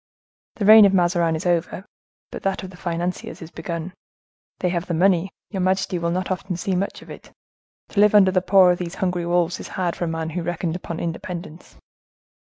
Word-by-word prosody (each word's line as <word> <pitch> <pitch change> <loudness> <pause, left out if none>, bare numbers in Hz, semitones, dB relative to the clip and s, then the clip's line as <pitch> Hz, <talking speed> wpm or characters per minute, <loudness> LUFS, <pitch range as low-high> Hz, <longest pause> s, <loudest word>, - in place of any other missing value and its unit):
The 205 - -2
reign 215 0 +9
of 195 -1 +3
Mazarin 175 -2 +2
is 160 - -5
over, 175 +2 -1 0.5
but - - -7
that 195 -1 -2
of 190 - -8
the - - -13
financiers 175 0 -4
is 165 0 -10
begun. 170 +1 -5 0.6
They 180 - -1
have 175 0 -2
the 170 - -1
money; 185 +1 +2 0.2
your 190 -3 -2
majesty 185 -1 0
will 170 0 -1
not 185 +2 -2
often 185 -1 -3
see 190 +2 -2
much 195 +2 -3
of - - -13
it. - - -12 0.6
To 200 - -2
live 210 0 +5
under 190 -2 +6
the 185 -1 +2
paw 185 -1 +5
of 175 - -1
these 175 0 -5
hungry 180 -3 -2
wolves 175 0 +1
is - - -7
hard 180 -2 -2
for 175 - -3
a - - -3
man 165 0 -3
who 175 +2 -3
reckoned 170 0 -3
upon 170 -2 -6
independence." 170 0 -6
180 Hz, 210 wpm, -22 LUFS, 170-190 Hz, 0.6 s, reign